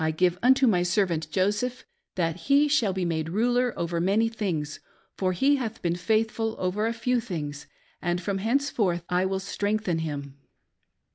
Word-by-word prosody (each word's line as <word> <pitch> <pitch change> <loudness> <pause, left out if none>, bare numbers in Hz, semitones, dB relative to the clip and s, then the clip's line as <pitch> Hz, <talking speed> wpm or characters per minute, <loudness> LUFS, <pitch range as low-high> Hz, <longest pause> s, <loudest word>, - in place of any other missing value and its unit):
give 180 0 +2
unto 260 +2 +5
my 195 -7 +3
servant 175 -4 0
Joseph, 210 - -1 0.3
that 165 -3 0
he 285 +2 +5
shall 265 -9 +2
be 185 -1 -2
made 160 -2 -1
ruler 245 +6 +2
over 170 0 -1
many 205 +5 +2
things, 170 -9 -3 0.4
for 185 -1 0
he 275 +11 +3
hath 225 -4 -4
been 170 -1 +1
faithful 220 +4 0
over 195 +4 0
a - - 0
feT* 240 +1 0
things, 150 -8 -5 0.3
and 175 0 0
from 195 +2 -2
henceforth 220 - 0
I 180 +1 +2
will 190 0 -1
strengthen 200 -2 -1
him. 140 -3 -5
190 Hz, 160 wpm, -26 LUFS, 170-225 Hz, 0.4 s, unto